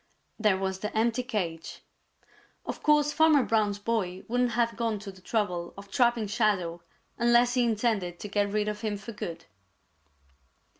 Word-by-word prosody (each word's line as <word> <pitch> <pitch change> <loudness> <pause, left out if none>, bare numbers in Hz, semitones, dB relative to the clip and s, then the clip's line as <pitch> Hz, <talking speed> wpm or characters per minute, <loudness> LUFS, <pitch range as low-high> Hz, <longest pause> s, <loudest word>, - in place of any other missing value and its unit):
There 210 -3 +3
was 190 0 -2
the 210 - -3
empty 230 +2 +2
cage. 185 -10 -4 0.8
Of - - -5
course 295 -1 +3
Farmer 310 -3 +5
Brown's 210 -3 +1
boy 205 -4 -2
wouldn't 245 0 +1
have 230 -1 +1
gone 225 -1 -1
to 200 0 -8
the 190 -1 -17
trouble 180 -5 -2
of 200 0 -11
trapping 240 -2 +2
Shadow 195 -5 0 0.4
unless 240 +1 +4
he 250 -1 +3
intended 210 -6 0
to - - -5
get 205 0 0
rid 210 +1 0
of 210 0 -3
him 215 -2 -2
for 205 +4 -8
good. 175 -6 -6
215 Hz, 160 wpm, -28 LUFS, 195-235 Hz, 0.8 s, Farmer